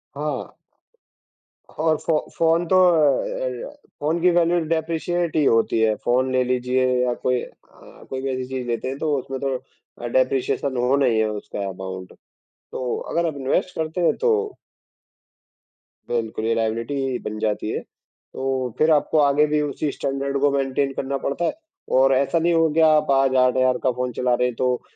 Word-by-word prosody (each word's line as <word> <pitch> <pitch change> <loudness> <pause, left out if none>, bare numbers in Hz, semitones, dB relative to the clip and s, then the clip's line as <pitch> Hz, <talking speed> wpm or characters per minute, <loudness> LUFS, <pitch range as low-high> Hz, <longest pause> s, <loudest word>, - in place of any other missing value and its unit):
हाँ। 145 -2 -4 1.2
और 155 0 0
फ़ो 160 -2 0 0.2
फ़ोन 165 +1 +3
तो 185 - +2
अ, 150 -5 +3
एर 125 -2 -4 0.3
फ़ोन 155 +4 0
की 180 - +5
वैल्यू 175 0 +3
डेप्रिशिएट 165 +1 -1
ही 155 - +3
होती 115 -1 +2
है। 110 -1 +3
फ़ोन 130 +2 +2
ले 130 0 +2
लीजिए 125 +1 0 0.2
या 125 -1 +1
कोई 125 0 -1
अ, - - -16
कोई 130 0 -4
भी 135 - -2
ऐसी 130 0 -3
चीज़ 130 -2 -4
लेते 120 +2 -2
हैं, 135 +1 -4
तो 150 -1 0
उसमें 135 +1 -5
तो 135 -1 -1 0.5
अ, - - -3
डेप्रिशिएशन 400 - 0
होना 135 +3 +2
ही 115 -3 +2
है 110 -1 +1
उसका 105 -1 -5
अमाउंट। 95 0 -7 0.6
तो 125 -1 -3 0.2
अगर 170 0 +1
आप 155 - -3
इन्वेस्ट 135 +7 -1
करते 160 +3 -2
हैं, 170 - +3
तो 440 -3 0 1.5
बिल्कुल, 110 -2 -2
ये 115 - +2
लाएबिलिटी 115 +3 -1
ही 130 -2 -2
बन 105 0 -4
जाती 105 0 -1
है। - - -2
तो 130 -1 -6
फिर 155 +1 +3
आपको 155 +1 +2
आगे 145 +1 +4
भी 150 0 +1
उसी 145 0 -2
स्टैन्डर्ड 140 0 -2
को 145 -1 +4
मेन्टेन 135 0 0
करना 135 +1 -2
पड़ता 140 +5 -2
है, - - 0 0.4
और 135 +1 +4
ऐसा 140 +5 +1
नहीं 170 +1 +2
हो 165 -1 +3
गया, 160 +1 +4
आप 155 -2 +3
आज 135 -1 +3
8000 130 0 +3
का 130 - +3
फ़ोन 125 0 -3
चला 125 -1 +1
रहे 125 +1 +1
हैं, 120 - -5
तो 125 -1 0
135 Hz, 185 wpm, -22 LUFS, 125-155 Hz, 1.5 s, की